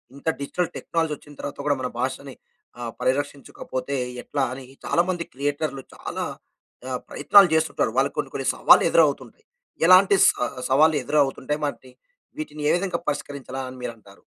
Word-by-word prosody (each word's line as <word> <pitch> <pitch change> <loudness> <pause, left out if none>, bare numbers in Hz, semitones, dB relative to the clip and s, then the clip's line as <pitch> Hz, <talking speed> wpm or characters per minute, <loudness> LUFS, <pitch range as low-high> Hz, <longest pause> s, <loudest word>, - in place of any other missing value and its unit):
ఇంత 140 - -13
digital 165 +5 -2
technology 165 -2 -1
వచ్చిన 145 +1 -16
తర్వాత 145 - -6
గూడా 145 -1 +2
మన 125 - -1
భాషని 130 +1 -3 0.5
ఆహ్, 120 -1 -4
పరిరక్షించకపోతే 140 0 -3 0.3
ఎట్లా 140 -2 -2
అని 130 +1 -8 0.2
చాలా 170 - +3
మంది 175 -2 -1
క్రియేటర్లు 145 +1 -2
చాలా - - -5 0.7
ఆహ్, 125 -1 -2
ప్రయత్నాలు 200 -3 +6
చేస్తుంటారు. 160 0 +1
వాళ్ళకు - - +2
కొన్ని - - -3
కొన్ని - - -2
సవాళ్ళు - - +6
ఎదురవుతుంటాయి. 455 - +1 0.4
ఎలాంటి 185 +2 +7
సా 125 - -1 0.2
సవాళ్ళు 155 +4 +5
ఎదురవుతుంటాయి? 145 +1 0
వాటిని 130 -3 -6 0.5
వీటిని 220 - -6
ఏ - - +5
విధంగా 180 -2 -2
పరిష్కరించాలా 140 -2 -5
అని 130 - -10
మీరంటారు? 110 -5 -9
145 Hz, 145 wpm, -24 LUFS, 130-160 Hz, 0.7 s, ఎలాంటి